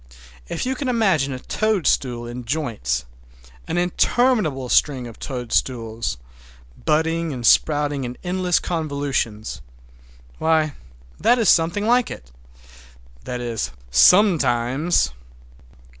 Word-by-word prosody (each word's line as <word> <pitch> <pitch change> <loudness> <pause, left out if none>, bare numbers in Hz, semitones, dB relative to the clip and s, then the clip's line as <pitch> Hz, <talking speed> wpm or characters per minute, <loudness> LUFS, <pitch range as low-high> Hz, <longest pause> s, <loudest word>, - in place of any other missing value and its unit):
If - - -3
you 260 - 0
can 265 0 -3
imagine 190 - +2
a 130 - -4
toadstool 140 - 0
in 120 +1 -7
joints, 110 - -2 0.6
an - - -2
interminable 180 - +1
string 130 0 +2
of 115 -2 -11
toadstools, 115 - -2 0.7
budding 160 +1 +1
and 125 -4 -5
sprouting 145 +1 +3
in 125 0 -6
endless 180 -1 +1
convolutions,—why, 105 - -3 0.5
that 245 - +4
is 225 -6 +3
something 170 +6 +3
like 245 +1 +3
it. - - -10 0.9
That 125 0 -4
is, 120 -2 -3 0.2
sometimes! 135 - +4
140 Hz, 100 wpm, -22 LUFS, 115-175 Hz, 0.9 s, that